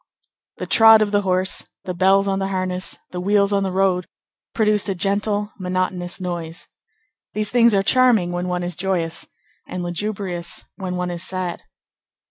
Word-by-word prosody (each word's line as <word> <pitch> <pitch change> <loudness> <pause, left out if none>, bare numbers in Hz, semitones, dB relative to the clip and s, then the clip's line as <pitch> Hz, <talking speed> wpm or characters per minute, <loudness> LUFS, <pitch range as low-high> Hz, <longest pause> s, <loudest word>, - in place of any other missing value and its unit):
The - - -4
trot 225 -1 +7
of 205 - -3
the 205 0 +2
horse, 185 -1 0 0.2
the 180 - -4
bells 195 +2 +3
on 195 0 0
the 195 - -1
harness, 185 -1 -3
the 180 - -4
wheels 200 +1 +2
on 200 - +2
the 190 -1 -1
road, 185 -2 +1 0.4
produced 210 -2 +1
a 195 - -1
gentle, 205 +2 -1
monotonous 180 -1 -2
noise. 175 -2 -5 0.7
These 215 -1 0
things 235 -3 +5
are 195 - +2
charming 235 -6 +3
when 175 +1 -3
one 180 0 -2
is 175 0 -3
joyous, 175 -3 -2 0.4
and 180 -1 -5
lugubrious 175 -1 -3
when 185 -2 -4
one 180 0 -2
is 170 -1 -3
sad. 185 -1 -3
185 Hz, 165 wpm, -21 LUFS, 180-205 Hz, 0.7 s, trot